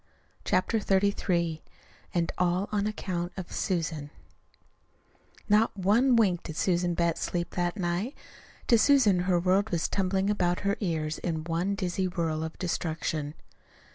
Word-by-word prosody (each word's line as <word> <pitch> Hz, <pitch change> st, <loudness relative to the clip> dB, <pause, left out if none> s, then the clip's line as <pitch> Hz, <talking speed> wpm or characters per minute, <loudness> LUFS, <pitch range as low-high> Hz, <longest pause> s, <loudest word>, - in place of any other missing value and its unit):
CHAPTER 185 Hz, +5 st, +1 dB
XXXIII 190 Hz, -5 st, +1 dB, 0.5 s
AND 170 Hz, -2 st, 0 dB
ALL 180 Hz, +2 st, +1 dB
ON 210 Hz, -1 st, 0 dB
ACCOUNT 180 Hz, -4 st, -3 dB
OF 185 Hz, -2 st, -6 dB
SUSAN 160 Hz, -6 st, -2 dB, 1.4 s
Not 210 Hz, 0 st, +3 dB
one 225 Hz, +7 st, +4 dB
wink 195 Hz, -7 st, +3 dB
did 160 Hz, -, -7 dB
Susan 175 Hz, 0 st, +1 dB
Betts 170 Hz, -1 st, 0 dB
sleep 175 Hz, -1 st, -2 dB
that 175 Hz, +3 st, -1 dB
night. 185 Hz, -, -2 dB, 0.5 s
To 235 Hz, -, +5 dB
Susan 235 Hz, -9 st, +5 dB
her 180 Hz, -1 st, +2 dB
world 190 Hz, +4 st, +2 dB
was 170 Hz, -2 st, 0 dB
tumbling 195 Hz, +1 st, 0 dB
about 180 Hz, -4 st, 0 dB
her 200 Hz, 0 st, +1 dB
ears 155 Hz, -5 st, -2 dB
in 160 Hz, -3 st, -2 dB
one 170 Hz, +4 st, -1 dB
dizzy 185 Hz, 0 st, -1 dB
whirl 165 Hz, -3 st, -2 dB
of 160 Hz, 0 st, -6 dB
destruction. 160 Hz, -3 st, -2 dB
180 Hz, 140 wpm, -28 LUFS, 170-200 Hz, 1.4 s, To